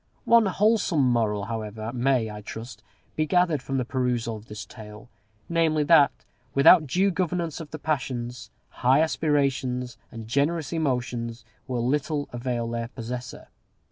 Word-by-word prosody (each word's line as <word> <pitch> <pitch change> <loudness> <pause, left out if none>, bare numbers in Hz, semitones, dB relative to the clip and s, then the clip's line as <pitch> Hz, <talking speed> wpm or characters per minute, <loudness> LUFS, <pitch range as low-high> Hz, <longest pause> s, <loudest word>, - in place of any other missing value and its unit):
One 230 -2 +5
wholesome 190 - +2
moral, 105 -4 +1
however, 110 0 -5
may, 125 -3 +1
I 105 0 -8
trust, 110 +1 -8 0.3
be 155 0 0
gathered 170 -3 +2
from 135 +1 -3
the 125 - 0
perusal 120 -3 -1
of 110 +1 -11
this 105 -1 -7
Tale; 105 0 -12 0.4
namely, 165 -2 +2
that, 145 -2 +6 0.4
without 155 +3 +7
due 190 +8 +2
governance 175 -3 -2
of 160 -3 -8
the 155 - -6
passions, 125 -5 -3 0.3
high 130 +4 +5
aspirations 135 -6 0
and 115 -2 -8
generous 140 +4 0
emotions 125 -6 -2 0.2
will 120 -2 -1
little 145 +1 -1
avail 120 -1 -2
their 115 0 -3
possessor. 125 +1 -7
130 Hz, 140 wpm, -26 LUFS, 115-155 Hz, 0.4 s, without